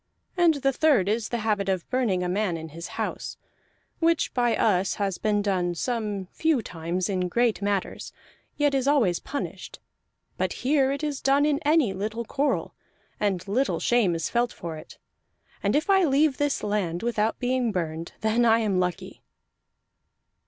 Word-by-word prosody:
And 345 -3 +4
the 275 -1 +1
third 275 -10 +3
is 220 +1 0
the 240 - -1
habit 205 -3 0
of 185 -3 -1
burning 225 -8 +1
a - - -1
man 185 -1 0
in 160 0 -8
his 170 +2 -8
house, - - -4 0.6
which 335 -1 +2
by 240 -2 +2
us 195 -3 +2
has 195 -3 -2
been 210 -1 +1
done 180 -3 0
some 210 -2 -2
few 315 -7 +1
times 170 +1 -3
in 185 -2 -1
great 235 +2 +1
matters, 200 -1 -2 0.5
yet 290 -1 +2
is 270 -1 +1
always 235 - +3
punished; 190 - -6 0.6
but - - -1
here 270 -1 +3
it 280 +2 -3
is 295 -3 -2
done 275 +2 +3
in 295 -1 +1
any 295 -8 +3
little 215 +4 -4
quarrel, 280 +6 -1 0.5
and 200 -3 -1
little 255 +7 0
shame 225 -8 +2
is 165 - -2
felt 240 0 0
for 170 -3 -6
it. 155 - -12 0.6
And 200 +1 +1
if 310 +3 +1
I 385 -1 +4
leave 285 -2 +2
this 290 -1 0
land 200 -4 -1
without 225 -2 0
being 250 -2 0
burned, 165 -3 -4
then 220 +2 +2
I 225 -1 +5
am 210 -5 +1
lucky." 180 -1 -3
220 Hz, 170 wpm, -26 LUFS, 185-270 Hz, 0.6 s, I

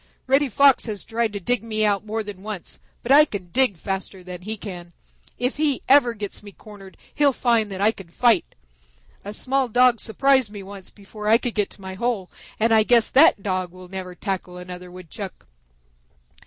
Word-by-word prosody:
Reddy 275 +2 +3
Fox 270 +1 +4
has 210 -3 -5
tried 230 -1 -1
to 205 - -4
dig 245 +6 0
me 215 -1 0
out 205 -1 +1
more 220 +1 -3
than 205 -3 -9
once, 205 -3 -7 0.2
but 235 - -2
I 295 +2 +9
can 195 - -6
dig 255 -6 +4
faster 190 +1 -5
than 180 -1 -8
he 215 +4 -5
can. 175 -4 -9 0.4
If 250 +4 -1
he 295 -3 0
ever 260 -4 +5
gets 205 -2 -6
me 205 -1 -12
cornered, 200 -1 -14 0.2
he'll 290 -1 +3
find 235 -4 +1
that 190 0 -5
I 210 +2 +4
can 195 -6 -13
fight. 230 +1 +2 0.7
A 205 - -6
small 265 +4 -1
Dog 245 0 +4
surprised 265 +1 +2
me 205 -1 -9
once 195 -1 -10
before 210 +1 -10
I 220 +2 +6
could 240 -1 -3
get 205 -2 0
to - - -13
my 190 0 -7
hole 205 -2 -3 0.3
and 225 +1 +3
I 220 - +6
guess 230 +1 +3
that 275 -8 +5
Dog 185 -3 -2 0.2
never 190 -1 -5
will 180 - -11
tackle 185 -2 -4
another 180 0 -9
Woodchuck." 185 +2 -9
210 Hz, 195 wpm, -23 LUFS, 190-240 Hz, 0.7 s, I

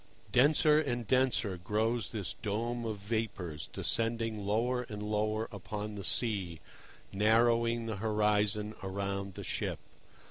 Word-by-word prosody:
Denser 150 +3 +5
and 120 -5 -2
denser 120 -5 +2
grows 110 +3 0
this 100 -5 -3
dome 115 +3 -2
of 110 -2 -2
vapours, 100 -7 -3
descending 115 -2 0
lower 120 +4 +1
and 105 -1 -5
lower 110 +1 0
upon 105 +1 -5
the 100 -1 -6
sea, 95 -8 0 0.5
narrowing 115 +3 +3
the 110 -2 -3
horizon 105 0 +1
around 100 0 -3
the - - -6
ship. - - -2
110 Hz, 120 wpm, -32 LUFS, 100-115 Hz, 0.5 s, Denser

